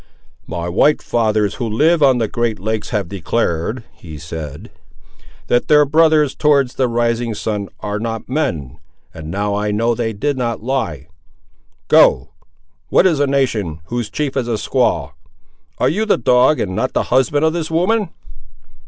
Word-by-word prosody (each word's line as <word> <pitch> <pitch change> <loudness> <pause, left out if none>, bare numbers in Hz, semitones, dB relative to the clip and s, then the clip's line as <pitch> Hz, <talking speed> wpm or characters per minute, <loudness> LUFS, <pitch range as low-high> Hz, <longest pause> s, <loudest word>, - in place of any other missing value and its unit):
"My 85 +1 -4
white 110 - +3
fathers 110 -3 0
who 115 - -1
live 155 +9 +2
on 135 -3 +5
the 115 -2 0
great 120 -1 -1
lakes 110 +2 -3
have 105 -6 -2
declared," 100 +3 -2
he 80 -3 -11
said, 80 +3 -8 0.7
"that 120 - +1
their 150 -1 +5
brothers 155 -1 +3
towards 140 -4 +2
the 130 - 0
rising 115 -1 -1
sun 105 -1 -3
are 105 +1 -3
not 115 0 -4
men; 80 - -3 0.3
and 80 -1 -9
now 100 +3 -2
I 105 +1 -1
know 115 +3 +1
they 115 -1 -2
did 130 +6 -2
not 115 -3 -2
lie! 100 - -2 0.8
Go—what - - +1
is 165 -6 +3
a 145 - +2
nation 110 - -1
whose 120 -3 -3
chief 140 +4 -3
is 130 -3 -1
a 115 - 0
squaw! 85 - 0 0.7
Are - - +1
you 215 +6 0
the - - +3
dog 125 +5 +3
and 95 -2 -2
not 130 +5 -1
the - - +1
husband 140 +4 +2
of 160 - +2
this 165 -2 -3
woman?" 190 +6 +1
115 Hz, 160 wpm, -18 LUFS, 100-140 Hz, 0.8 s, on